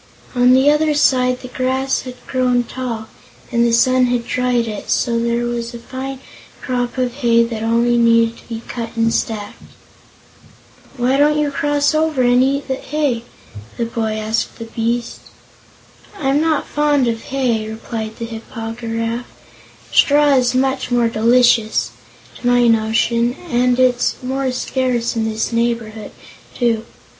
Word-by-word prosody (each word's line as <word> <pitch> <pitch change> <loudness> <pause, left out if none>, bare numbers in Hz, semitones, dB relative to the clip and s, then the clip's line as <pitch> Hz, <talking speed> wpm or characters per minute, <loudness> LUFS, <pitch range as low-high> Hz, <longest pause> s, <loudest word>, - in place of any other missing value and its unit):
On 250 0 +4
the 270 +3 +5
other 300 0 +2
side 255 -3 +2
the 255 - -8
grass 260 +1 -1
had 255 -1 -8
grown 250 -2 +1
tall, 235 -3 -5 0.5
and 235 -1 +2
the 235 - +2
sun 255 +2 +4
had 245 -1 -1
dried 250 -2 0
it, 210 -2 -6
so 235 -2 +1
there 235 +1 0
was 240 0 -4
a - - -5
fine 260 +2 -7 0.4
crop 245 -1 -3
of 250 -1 0
hay 235 -3 +3
that 230 -2 -4
only 235 +1 +2
needed 230 0 +3
to - - -20
be 230 0 -6
cut 230 -1 -6
and 230 0 +2
stacked. 210 -2 -3 1.4
"Why 250 +2 +1
don't 295 +1 +3
you 295 -1 0
cross 290 +1 +1
over 310 -4 +1
and 245 +1 +4
eat 275 +2 +1
hay?" 265 -2 -2 0.5
the 235 - -1
boy 225 -1 -2
asked 220 +1 -2
the 230 - -7
beast. 230 +1 -2 1.0
"I'm 280 -2 +1
not 315 -2 +1
fond 290 -3 +1
of 225 -1 -2
hay," 240 -5 -1
replied 220 0 -6
the 230 - -4
Hip 225 -1 -9
po 225 -2 -5
gy 230 0 -8
raf; 230 +1 -3 0.6
"straw 290 0 +4
is 250 -1 +2
much 265 0 0
more 240 -2 +2
delicious, 225 - +3 0.5
to 245 - -3
my 245 0 +4
notion, 230 +2 +2 0.2
and 245 +1 +2
it's 250 -1 +2
more 265 +1 -1
scarce 250 -2 -1
in 220 -1 0
this 220 +1 -2
neighborhood, 230 -2 -2 0.5
too. 230 -2 0
245 Hz, 155 wpm, -18 LUFS, 230-260 Hz, 1.4 s, the